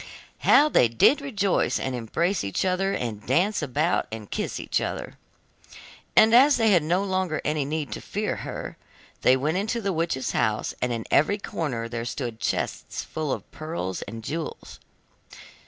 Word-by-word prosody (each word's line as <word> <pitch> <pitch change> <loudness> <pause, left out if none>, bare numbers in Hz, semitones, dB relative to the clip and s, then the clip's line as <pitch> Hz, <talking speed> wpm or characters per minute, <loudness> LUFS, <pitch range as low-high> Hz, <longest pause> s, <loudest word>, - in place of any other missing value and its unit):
How 295 - +6
they 125 - +4
did 115 - +4
rejoice 205 -9 0
and 130 - -2
embrace 170 - -1
each 100 - -1
other, 190 +1 +1
and 110 - -3
dance 180 - +1
about 150 +4 0
and 110 -2 -7
kiss - - -3
each - - -1
other! - - -4 1.0
And 220 +1 +7
as 275 +4 +7
they 225 -2 +3
had 180 -4 +5
no 175 +5 +1
longer 185 -5 -1
any 150 -2 0
need 150 -3 -3
to - - -5
fear - - -3
her, - - -6 0.4
they 130 - +5
went 155 +6 0
into 215 +4 -1
the 200 -3 -1
witch's 165 -5 -1
house, 110 -1 0
and 125 - 0
in 115 -2 -3
every 200 +8 +4
corner 130 - -3
there 115 0 -4
stood 120 -2 -4
chests - - -2
full 155 -3 -4
of - - -5
pearls 155 - -4
and 115 0 -7
jewels. 155 +5 -6
155 Hz, 170 wpm, -25 LUFS, 120-195 Hz, 1.0 s, And